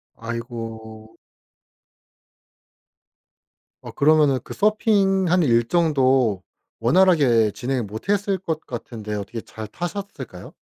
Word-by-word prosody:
아이고. 115 Hz, -2 st, -7 dB, 2.7 s
어 -, -, -9 dB
그러면은 145 Hz, -3 st, +3 dB
그 -, -, -8 dB
서핑하는 195 Hz, -, +2 dB
일정도 130 Hz, -, +2 dB, 0.4 s
원활하게 125 Hz, -, +4 dB
진행을 130 Hz, +1 st, -2 dB
못 110 Hz, -, -8 dB
했을 200 Hz, -1 st, +1 dB
것 160 Hz, -4 st, -4 dB
같은데 110 Hz, -3 st, -7 dB
어떻게 105 Hz, +3 st, -5 dB
잘 110 Hz, -1 st, -9 dB
타셨을까요? 175 Hz, -, -7 dB
130 Hz, 220 characters per minute, -22 LUFS, 115-175 Hz, 2.7 s, 원활하게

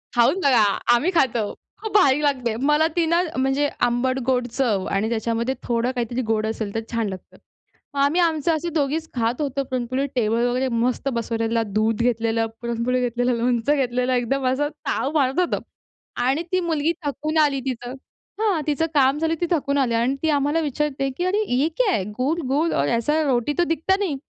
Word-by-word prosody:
खाऊन 240 Hz, +10 st, +4 dB
बघा, 250 Hz, -6 st, +5 dB, 0.3 s
आम्ही 305 Hz, +10 st, +2 dB
खातो. 240 Hz, -, +1 dB, 0.3 s
खूप 440 Hz, -2 st, -5 dB
भारीक 280 Hz, -1 st, +4 dB
लागते. 250 Hz, -6 st, 0 dB
मला 310 Hz, +2 st, +4 dB
ती 340 Hz, -1 st, +2 dB
ना, 335 Hz, +2 st, +2 dB, 0.2 s
म्हणजे 270 Hz, +2 st, +1 dB, 0.2 s
आंबट-गोड 250 Hz, 0 st, 0 dB
चव 225 Hz, -6 st, 0 dB
आणि 205 Hz, +3 st, 0 dB
त्याच्यामध्ये 235 Hz, +3 st, -1 dB
थोडं 240 Hz, +1 st, 0 dB
काहीतरी 240 Hz, +1 st, -2 dB
गोड 220 Hz, -1 st, +1 dB
असेल, 220 Hz, -2 st, -4 dB
तर 225 Hz, -, +1 dB
छान 230 Hz, -2 st, -1 dB
लागतं. 185 Hz, -1 st, -10 dB, 0.6 s
मग 280 Hz, -, -3 dB
आम्ही 300 Hz, +6 st, +3 dB
आमचं 325 Hz, -1 st, +1 dB
असे 340 Hz, +2 st, -3 dB
दोघीचं 310 Hz, +2 st, 0 dB
खात 230 Hz, +5 st, 0 dB
होतो 275 Hz, -1 st, -1 dB
पुरणपोळी 255 Hz, +1 st, -2 dB
टेबल 235 Hz, 0 st, +1 dB
वगैरे 255 Hz, +2 st, 0 dB
मस्त 245 Hz, +4 st, 0 dB
बसवलेला 230 Hz, 0 st, -1 dB
दूध 215 Hz, +2 st, 0 dB
घेतलेलं, 230 Hz, -1 st, +1 dB, 0.2 s
पुरणपोळी 235 Hz, +2 st, -1 dB
घेतलेलं, 245 Hz, 0 st, 0 dB
लोणचं 245 Hz, +3 st, +1 dB
घेतलेलं 250 Hz, -2 st, 0 dB
एकदम 255 Hz, +2 st, 0 dB
असं 290 Hz, +3 st, +1 dB, 0.2 s
ताव 275 Hz, -, 0 dB
मारत 270 Hz, +2 st, +1 dB
होतो. 360 Hz, -, +1 dB, 0.7 s
आणि 275 Hz, +6 st, +1 dB
ती 370 Hz, -, +2 dB
मुलगी 325 Hz, -2 st, 0 dB
थकून 305 Hz, +2 st, -2 dB
आली 285 Hz, -3 st, +3 dB
तिथं. 245 Hz, -1 st, -4 dB, 0.5 s
हां, 390 Hz, -8 st, +2 dB
तिचं 300 Hz, +2 st, +1 dB
काम 275 Hz, 0 st, +4 dB
झालं, 325 Hz, 0 st, +1 dB
ती -, -, +3 dB
थकून 285 Hz, -4 st, +1 dB
आली 255 Hz, -4 st, +1 dB
अन 240 Hz, +4 st, +1 dB
ती 320 Hz, -, +2 dB
आम्हाला 290 Hz, +2 st, +1 dB
विचारते, 290 Hz, -2 st, -1 dB
की 350 Hz, -, -1 dB
"अरे 410 Hz, +4 st, +1 dB
ये 280 Hz, +5 st, +2 dB
क्या 410 Hz, -, +2 dB, 0.2 s
गुल, 305 Hz, +7 st, 0 dB
गुल 300 Hz, +5 st, +1 dB
और 140 Hz, -, +1 dB
ऐसी 300 Hz, +7 st, +1 dB
रोटी 260 Hz, 0 st, +1 dB
तो 350 Hz, -, +4 dB
दिखता 380 Hz, +5 st, +1 dB
नहीं!" 330 Hz, -9 st, -1 dB
260 Hz, 185 wpm, -22 LUFS, 235-300 Hz, 0.7 s, बघा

